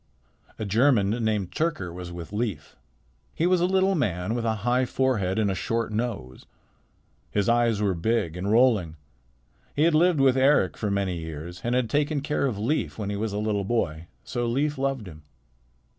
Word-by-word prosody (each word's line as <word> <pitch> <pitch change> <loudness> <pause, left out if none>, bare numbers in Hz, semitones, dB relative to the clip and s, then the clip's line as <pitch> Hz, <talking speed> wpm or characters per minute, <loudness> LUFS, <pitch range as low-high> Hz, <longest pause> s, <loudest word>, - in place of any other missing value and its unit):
A 110 - -4
German, 110 -1 +3
named 105 -5 0
Tyrker, 100 - -2
was 90 0 -7
with 85 +2 -8
Leif. 105 - -3 0.6
He 165 - +1
was 180 -1 +3
a 175 - +3
little 190 +1 +2
man 105 - -1
with 120 -1 -2
a 110 -1 +1
high 125 +1 +3
forehead 120 -7 0
and 105 -3 +2
a - - 0
short 115 +5 -2
nose. 105 - -4 0.8
His 100 -2 0
eyes 115 -3 +2
were 100 -2 +2
big 90 -1 -1
and 95 +3 -3
rolling. 110 -8 +3 0.8
He 145 - +2
had 165 0 +4
lived 170 0 +4
with 135 -1 +4
Eric 130 - +3
for 105 - -2
many 100 -3 -1
years, 80 +2 -7
and 120 +1 0
had 125 -2 +1
taken 145 +4 0
care 145 -1 0
of 115 -6 -3
Leif 120 +10 -1
when 105 -2 -3
he - - -2
was 110 +1 -2
a 100 - -3
little 105 -1 -1
boy. 85 -7 -2 0.2
So 120 -1 -2
Leif 140 +4 0
loved 135 -6 -1
him. 80 -3 -11
110 Hz, 190 wpm, -26 LUFS, 95-130 Hz, 0.8 s, had